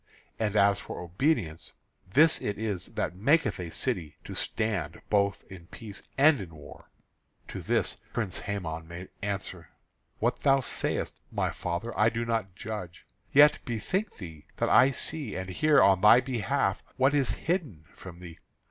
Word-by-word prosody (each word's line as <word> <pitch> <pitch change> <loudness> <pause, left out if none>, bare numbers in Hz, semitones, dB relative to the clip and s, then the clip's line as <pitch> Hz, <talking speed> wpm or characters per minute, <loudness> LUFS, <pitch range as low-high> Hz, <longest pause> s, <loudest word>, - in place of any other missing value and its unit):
And 110 -2 -1
as 100 -1 +4
for - - -7
obedience, 90 - -1 0.4
this 155 +8 +5
it 105 - -2
is 105 -4 -3
that - - -2
maketh 140 - +2
a 90 -2 -5
city 90 - -2
to - - -8
stand 90 -8 -2
both 100 -1 +2
in 90 -3 -12
peace 105 0 -9 0.2
and 145 -3 +5
in 85 -4 -9
war." 75 - -13 0.6
To - - -6
this - - 0
the - - -30
Prince 105 -6 -2
Hæmon 80 -6 -4
made 85 +2 -8
answer: 95 -4 -4 0.5
"What - - 0
thou 135 -1 +4
sayest, 130 - -2
my - - -1
father, 90 +7 -4
I 110 +1 +4
do 115 +1 -3
not 110 -5 -2
judge. 100 -5 -7 0.3
Yet 150 +1 +7
bethink 145 - -2
thee, 80 -6 -10
that - - 0
I 130 - +7
see 140 -2 -2
and 95 0 -4
hear 155 +10 +4
on 95 -2 +4
thy 105 +3 +8
behalf 125 -4 -1 0.2
what 135 +2 +3
is 140 -3 +2
hidden 150 - -2
from 90 -2 -11
thee. 85 -2 -10
100 Hz, 165 wpm, -28 LUFS, 90-130 Hz, 0.6 s, thy